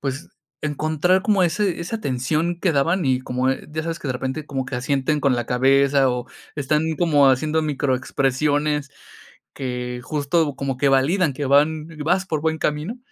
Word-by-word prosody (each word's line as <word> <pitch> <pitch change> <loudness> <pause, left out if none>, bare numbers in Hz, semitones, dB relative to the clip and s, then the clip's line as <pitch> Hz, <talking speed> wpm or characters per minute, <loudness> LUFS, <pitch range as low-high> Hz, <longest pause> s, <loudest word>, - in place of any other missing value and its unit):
pues, 135 0 -4 0.3
encontrar 155 +5 +1
como 205 -4 +2
ese 180 +1 0
esa 220 +6 -4
tensión 155 - -1
que 180 -4 +2
daban 165 +5 +1
y 130 -1 +2
como 130 +1 -1
ya 155 +3 -6
sabes 165 0 -3
que 145 - -5
de - - 0
repente 135 +4 -4
como 135 -2 -3
que 130 - -6
asienten 140 +3 0
con 135 -3 +2
la 120 - -3
cabeza 135 +1 +3
o 125 0 -3 0.3
están 150 +2 +1 0.2
como 145 -6 +4
haciendo 155 +4 +1
microexpresiones, 145 +1 0 0.6
que 125 -2 -4
justo 145 0 0
como 140 -2 -3
que 140 - +3
validan 145 +5 +2
que 145 -1 -3
van 150 +3 +3 0.2
vas 185 +3 +1
por 155 -4 -2
buen 160 0 -1
camino. 155 +13 -2
145 Hz, 170 wpm, -22 LUFS, 130-160 Hz, 0.6 s, como